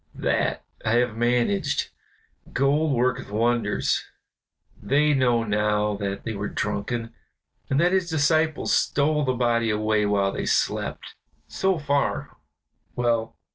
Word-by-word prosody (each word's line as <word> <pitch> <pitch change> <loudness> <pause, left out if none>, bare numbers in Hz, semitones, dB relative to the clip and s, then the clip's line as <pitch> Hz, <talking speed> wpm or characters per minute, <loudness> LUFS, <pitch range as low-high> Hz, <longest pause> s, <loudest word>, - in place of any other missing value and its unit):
That - - 0 0.2
I 110 - +1
have 120 -1 +2
managed 125 - 0 0.6
gold 145 +3 +2
worketh 125 +1 0
wonders; 115 0 0 0.8
they 150 +2 +2
know 125 -4 +2
now 105 0 0
that 100 -1 -4
they 115 - -3
were 105 0 -3
drunken, 115 +3 -3 0.6
and 135 - +2
that 175 +2 +3
his 185 -2 +1
disciples 155 0 +1
stole 150 +1 +2
the 130 - +1
body 120 -2 +1
away 105 0 +1
while 100 -1 +1
they - - -4
slept. - - -1 0.3
So 190 -1 0
far, 145 -2 -1 0.6
well. 115 -2 0
120 Hz, 125 wpm, -24 LUFS, 110-145 Hz, 0.8 s, that